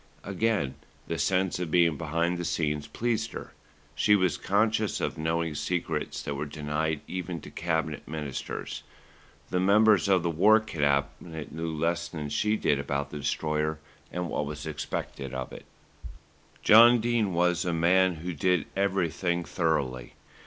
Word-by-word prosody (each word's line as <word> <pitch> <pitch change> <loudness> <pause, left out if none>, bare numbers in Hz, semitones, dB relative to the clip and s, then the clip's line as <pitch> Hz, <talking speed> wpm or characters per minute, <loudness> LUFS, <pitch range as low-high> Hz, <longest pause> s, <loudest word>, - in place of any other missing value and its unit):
Again, 100 -8 0 0.3
the 85 - -3
sense 95 +4 +1
of 90 -3 -3
being 85 -1 +4
behind 85 +3 -1
the - - -2
scenes 75 -4 -1
pleased 115 -1 -2
her. - - -8 0.4
She 105 - +4
was 95 -6 +2
conscious 105 0 +1
of - - -2
knowing 80 0 -1
secrets 80 0 -2
that 70 - -3
were 70 +1 -4
denied 75 +1 -2
even 90 -2 -4
to - - -11
Cabinet 80 -2 -2
Ministers. 75 -3 -5 0.7
The 90 - +1
members 100 0 +5
of 95 -3 +3
the 85 - +1
War 105 +7 +5
Cabinet 70 -4 -2
knew 80 +1 -3
less 85 +2 -1
than 75 -4 -5
she 105 +9 +1
did 70 -8 +1
about 70 0 -3
the 75 - -5
Destroyer 75 +2 -1 0.3
and 90 0 -3
what 75 -2 -2
was 75 0 -6
expected 70 -3 -5
of 65 -1 -5
it. - - -10 1.0
John 120 +2 +8
Dene 115 -3 +1
was 90 0 +2
a 90 - -1
man 90 +2 +3
who 85 +3 -5
did 90 +1 +1
everything 90 -2 0
thoroughly. 65 -6 -1
85 Hz, 150 wpm, -28 LUFS, 75-95 Hz, 1.0 s, John